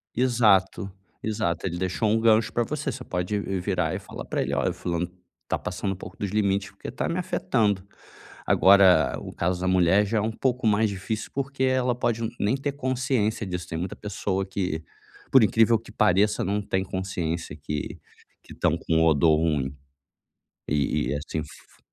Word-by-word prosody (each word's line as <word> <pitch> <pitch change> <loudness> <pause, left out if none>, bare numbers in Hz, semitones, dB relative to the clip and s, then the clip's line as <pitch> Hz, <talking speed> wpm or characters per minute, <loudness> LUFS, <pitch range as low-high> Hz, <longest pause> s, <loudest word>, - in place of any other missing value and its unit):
Exato, 105 -6 +3 0.3
exato, 105 -7 -1
ele 85 -2 -2
deixou 95 +4 0
um 110 +2 +3
gancho 110 -1 +3
pra 120 - +2
você, 145 +3 -3
você 125 +1 -7
pode 90 +2 -2 0.2
virar 90 -3 0
e - - -3
falar - - -9
pra - - -1
ele: 70 +2 -3
"Olha, 70 -2 +1
o - - -3
fulano 85 0 -3 0.4
tá - - 0
passando 95 +2 -3
um - - -7
pouco - - -10
dos 100 - -3
limites 100 -1 0
porque - - -9
tá - - -2
me 170 - -1
afetando". 120 - 0 0.6
Agora 90 -7 +5
o - - -8
caso 90 +1 -1
da 95 - 0
mulher 95 +2 +4
já 110 +2 -1
é - - 0
um 110 +2 -1
pouco 125 0 0
mais 110 +1 +3
difícil, 100 +3 -4
porque 140 -1 -2
ela 130 -2 +2
pode 115 -2 -1
nem 105 +6 +2
ter 140 +1 -3
consciência 130 -5 0
disso, 90 -1 -4
tem 80 - -4
muita 90 +3 -4
pessoa 95 -1 -2
que, 90 -4 -3 0.5
por 130 -3 +7
incrível 115 +2 +4
que 110 -1 -14
pareça, 105 0 +3
não 100 +2 0
tem 95 -1 -1
consciência 90 -4 -3
que 75 -1 -5 0.4
que - - -16
estão - - +1
com 80 0 +1
odor 80 0 +4
ruim 75 -4 0 0.9
e 70 -4 0
e 75 - 0
assim 75 +2 -4
f 75 -1 -11
100 Hz, 185 wpm, -25 LUFS, 90-115 Hz, 0.9 s, por